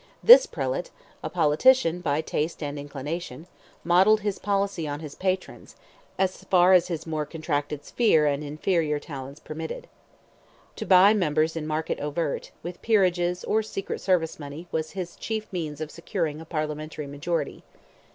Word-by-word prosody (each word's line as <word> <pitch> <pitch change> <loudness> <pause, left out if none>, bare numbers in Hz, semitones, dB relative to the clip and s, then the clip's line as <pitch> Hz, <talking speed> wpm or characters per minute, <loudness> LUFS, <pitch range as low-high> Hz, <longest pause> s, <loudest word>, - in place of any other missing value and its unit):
This - - +9
prelate, - - -3 0.3
a - - -4
politician 170 - +3
by 150 -2 0
taste 160 +1 -3
and 145 0 -4
inclination, 145 +1 -6 0.4
modelled 190 +5 +5
his 205 -1 -2
policy 200 -5 -1
on 145 0 -4
his 155 -3 -8
patron's, 185 0 -3 0.4
as 190 -1 -1
far 180 0 +5
as 180 -1 +5
his 165 -3 -4
more 155 -2 -2
contracted 145 -2 -3
sphere 185 -11 +3
and 145 0 0
inferior 150 +1 0
talents 140 -1 -8
permitted. 160 +1 -7 0.9
To - - -5
buy 190 +2 +7
members 160 -5 +1
in 155 -2 -4
market 155 +1 -2
overt, 150 +1 -3
with 175 +1 -7
peerages, 180 -5 +2
or 220 - +1
secret 205 -3 -5
service 175 -5 +1
money, 145 +4 -8
was 160 -1 -2
his 175 -2 -5
chief 220 -1 -4
means 155 -5 -4
of 155 -1 -5
securing 165 -3 -3
a - - -10
Parliamentary 155 -1 -4
majority. 145 +4 -3
165 Hz, 150 wpm, -26 LUFS, 150-185 Hz, 0.9 s, This